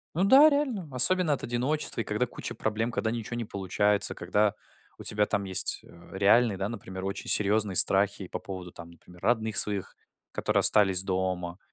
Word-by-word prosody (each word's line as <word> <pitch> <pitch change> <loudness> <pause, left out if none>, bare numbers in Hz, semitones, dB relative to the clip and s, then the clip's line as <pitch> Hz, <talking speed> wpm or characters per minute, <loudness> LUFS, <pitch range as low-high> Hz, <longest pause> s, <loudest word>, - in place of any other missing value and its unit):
Ну 185 - 0
да, 275 +9 +6
реально, 260 - -3
особенно 155 +5 +6
от - - -7
одиночества, 130 +6 -3
и - - -3
когда - - -2
куча - - -8
проблем, 110 +2 -3
когда 110 -1 -3
ничего 120 0 -6
не 120 - -5
получается, 100 +1 -1
когда 105 0 -1 0.4
у - - -10
тебя 105 0 0
там 100 -1 -3
есть, 95 -1 +1
э, 85 - -18
реальные, 100 +2 +2
да, 100 +2 -4
например, 95 -4 -9
очень 100 0 -6
серьезные 105 -2 +3
страхи 100 0 +4
по - - -7
поводу 95 -2 -10
там, 85 0 -13
например, 90 +1 -19
родных 110 -2 -1
своих, 100 -2 +1 0.4
которые - - -1
остались 95 -3 +3
дома, 95 -2 -4
105 Hz, 180 wpm, -26 LUFS, 95-120 Hz, 0.4 s, да